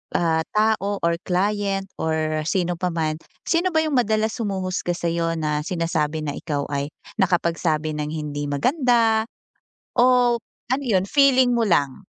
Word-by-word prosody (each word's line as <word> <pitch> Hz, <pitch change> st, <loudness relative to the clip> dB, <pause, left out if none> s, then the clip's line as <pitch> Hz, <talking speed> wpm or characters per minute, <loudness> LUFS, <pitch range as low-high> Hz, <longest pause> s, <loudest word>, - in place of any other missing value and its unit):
ah, 160 Hz, -1 st, +2 dB
tao 210 Hz, -2 st, +2 dB
or 170 Hz, 0 st, +1 dB
client 195 Hz, +1 st, 0 dB
or 155 Hz, -1 st, 0 dB
sino 175 Hz, -2 st, 0 dB
pa 180 Hz, -, 0 dB
man, 155 Hz, -1 st, -1 dB, 0.2 s
sino 345 Hz, +2 st, +1 dB
ba 315 Hz, -, +4 dB
'yung 310 Hz, -3 st, -1 dB
madalas 220 Hz, -1 st, +1 dB
humuhusga 185 Hz, -4 st, -2 dB
sa'yo 170 Hz, -1 st, -1 dB
na 150 Hz, -2 st, -1 dB
sinasabi 160 Hz, -3 st, -1 dB
na 145 Hz, -, -2 dB
ikaw 145 Hz, -3 st, -3 dB
ay 140 Hz, 0 st, -1 dB, 0.3 s
nakapagsabi 170 Hz, -4 st, +1 dB
ng 150 Hz, 0 st, -3 dB
hindi 145 Hz, -2 st, -4 dB
maganda, 230 Hz, -, +2 dB, 0.7 s
o, 245 Hz, -1 st, +4 dB, 0.3 s
ano 270 Hz, +3 st, 0 dB
'yun 195 Hz, -6 st, +1 dB
feeling 260 Hz, -2 st, +4 dB
mo 230 Hz, -, +2 dB
lang? 170 Hz, -3 st, +1 dB
180 Hz, 145 wpm, -23 LUFS, 160-220 Hz, 0.7 s, ba